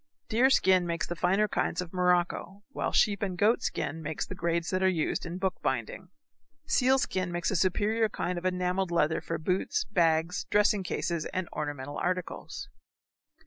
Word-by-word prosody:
Deer 245 +4 +4
skin 185 -8 +4
makes 170 0 -1
the 175 - -5
finer 190 +5 +2
kinds - - -1
of 180 -1 -4
morocco, 180 +2 0
while 275 - -2
sheep 205 -2 +3
and 190 -3 -2
goat 215 +5 +3
skin 160 +3 -3
make 155 0 -5
the - - -7
grades 170 -1 -1
that 185 0 0
are 190 - +4
used 170 -1 -1
in 170 +2 -5
book 190 -1 -2
binding. 130 +8 -3 0.6
Seal 260 +1 +3
skin 185 -8 -1
makes 175 +2 -1
a - - -1
superior 215 +5 +2
kind 180 -3 -2
of - - -15
enamelled 180 0 0
leather 165 -1 +1
for - - -3
boots, 185 - 0
bags, 165 -3 +1
dressing 210 -1 +3
cases, 170 -3 -2
and 185 -2 -3
ornamental 145 -2 -4
articles. 180 0 -3
180 Hz, 175 wpm, -29 LUFS, 170-195 Hz, 0.6 s, Deer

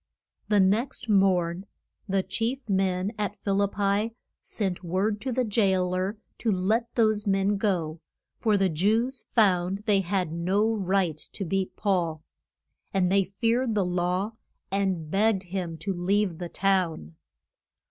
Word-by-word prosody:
The 210 -1 +3
next 230 +6 +1
morn 190 -2 +2 0.4
the 190 0 +1
chief 245 +5 -2
men 190 0 0
at 205 -1 -1
Phil 200 0 0
ip 200 0 0
pi 205 +3 0 0.3
sent 190 -4 -3
word 195 +5 -1
to 260 - -2
the 255 +1 +1
jail 190 -5 +1
er 190 +4 -1 0.2
to 225 - +1
let 215 +5 0
those 215 -2 +2
men 195 +1 +2
go, 170 -6 -1 0.4
for 215 -3 +2
the 195 -1 +3
Jews 220 - 0
found 195 -2 +2
they 205 -3 +4
had 185 -3 -1
no 195 +6 +1
right 190 -6 0
to 195 - -4
beat 190 +2 -1
Paul. 170 -6 0 0.7
And 185 -2 +1
they 195 0 +4
feared 230 +5 0
the 200 -3 +2
law, 180 +3 0 0.4
and 190 -5 -1
begged 200 -1 +2
him 175 -3 -4
to 195 +5 -3
leave 185 0 0
the 175 -1 -5
town. 175 - 0
195 Hz, 145 wpm, -27 LUFS, 180-210 Hz, 0.7 s, they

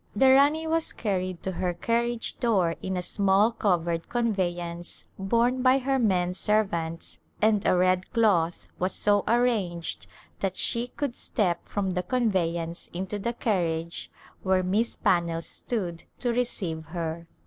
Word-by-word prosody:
The 260 +5 +6
Rani 290 +4 +4
was 325 0 +1
carried 185 -4 -2
to 190 - -2
her 180 -1 -2
carriage 235 +4 -1
door 190 -9 +2
in 190 -1 -2
a 180 - -2
small 200 +4 +3
covered 170 -6 0
conveyance 175 -7 -2
borne 235 +6 +1
by 255 +1 +5
her 270 0 0
men 180 -6 +2
servants 175 -6 -1 0.2
and 215 -2 +3
a - - +4
red 185 0 +2
cloth 185 -8 +2
was 185 +1 -1
so 205 -1 +2
arranged 215 -9 0 0.3
that 190 -1 -2
she 235 +1 +1
could 275 -1 -4
step 180 -6 -1
from 195 -2 -1
the 180 0 -1
conveyance 175 -8 -1
into 190 +3 -3
the 235 +4 -2
carriage 170 -7 -1 0.3
where 185 -1 +2
Miss 210 +6 +1
Pannell 170 -2 +1
stood 175 -8 -2
to 245 -2 -1
receive 185 -10 -2
her. 165 0 -5
190 Hz, 145 wpm, -27 LUFS, 175-235 Hz, 0.3 s, The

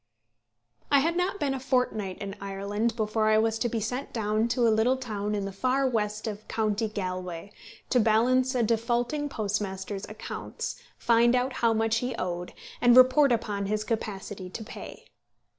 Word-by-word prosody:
I 285 - +5
had 330 +4 +1
not 365 +3 0
been 280 -2 0
a 270 - -3
fortnight 250 -7 0
in 200 0 -6
Ireland 200 +3 -2
before 215 -1 +1
I 215 - +5
was 225 0 +2 0.3
sent 250 +5 -4
down 215 0 0
to 235 0 +2
a 225 - +4
little 235 +4 +3
town 210 -5 -3
in 200 -1 -2
the 195 - -4
far 255 +7 +1
west 215 -3 -1
of 215 -1 -5
county 220 0 0
Galway, 185 -2 -5 0.4
to 250 - +4
balance 250 +4 +3
a 245 - +2
defaulting 240 +6 0
postmaster's 200 -3 -3
accounts, 215 +1 -6 0.2
find 235 +1 +4
out 255 +1 0
how 235 -3 +2
much 225 0 +1
he 250 +1 -2
owed, 175 -1 -4 0.3
and 245 0 +6
report 255 +2 +7
upon 205 -4 -1
his 215 +1 -1
capacity 205 -4 -4
to 220 +5 -7
pay. 220 - -10
220 Hz, 165 wpm, -27 LUFS, 205-250 Hz, 0.4 s, report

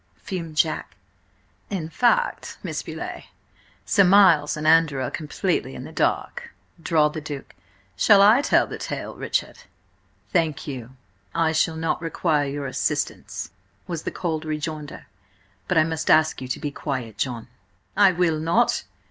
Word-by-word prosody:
fumed 165 -5 -6
Jack. 155 0 0 0.7
"In 185 -6 -3
fact, 485 - +1
Miss - - -3
Beauleigh, - - -7 0.6
Sir 200 - +4
Miles 180 -6 +5
and 150 - -4
Andrew 160 -3 +4
are 125 - -3
completely 155 -2 -2
in - - -7
the - - -9
dark," - - -2 0.3
drawled 155 -2 +2
the 155 - -5
Duke. 145 -2 -7 0.4
"Shall 200 - +6
I 215 +6 +7
tell 290 - +3
the - - -8
tale, - - -5
Richard?" - - -3 0.7
"Thank 165 -5 +1
you, 130 -3 -7 0.4
I 165 -1 +2
shall 160 0 +1
not 160 0 -1
require 160 -3 0
your 140 0 -4
assistance," 130 - -3 0.3
was 170 -3 -4
the - - -3
cold 160 -3 -3
rejoinder. 150 - -5 0.6
"But - - +1
I 155 - +6
must 160 -1 -3
ask 155 -3 +4
you 130 - -5
to 130 - -3
be 145 -2 -3
quiet, 125 -8 -5
John." 120 -3 -3 0.5
"I 200 -2 +6
will 170 -3 +1
not! 170 +10 +1
155 Hz, 150 wpm, -24 LUFS, 145-170 Hz, 0.7 s, I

